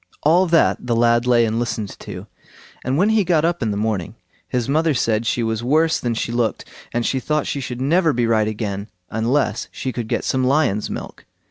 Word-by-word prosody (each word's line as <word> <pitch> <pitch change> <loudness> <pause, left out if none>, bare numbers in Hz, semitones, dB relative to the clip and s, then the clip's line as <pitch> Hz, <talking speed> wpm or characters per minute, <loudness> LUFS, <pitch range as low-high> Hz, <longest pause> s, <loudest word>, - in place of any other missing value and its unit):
All 175 +5 +4
that 165 -6 +2
the 120 - +1
lad 120 +1 +3
lay 120 -2 +4
and 110 +1 -1
listened 110 -4 -3
to; - - -8 0.6
and 130 +2 0
when 195 +6 +3
he 220 -2 +3
got 165 -3 +2
up 170 -1 0
in 110 - 0
the 100 - -2
morning 105 -5 -2 0.3
his 125 -2 -1
mother 155 +2 +2
said 115 -2 0
she 120 +1 0
was 110 0 -2
worse 155 +5 +2
than 120 -2 -2
she 115 - -2
looked, 120 -2 -1 0.3
and 120 0 -1
she 135 - 0
thought 150 +3 -1
she 140 - -3
should 125 -1 -5
never 165 +4 +3
be 120 -3 0
right 110 -2 +2
again 105 -1 -4 0.2
unless 115 0 0
she 130 - -4
could 120 -2 -4
get - - -1
some 130 -1 0
lion's 130 -6 +1
milk. - - -7
120 Hz, 215 wpm, -21 LUFS, 110-150 Hz, 0.6 s, All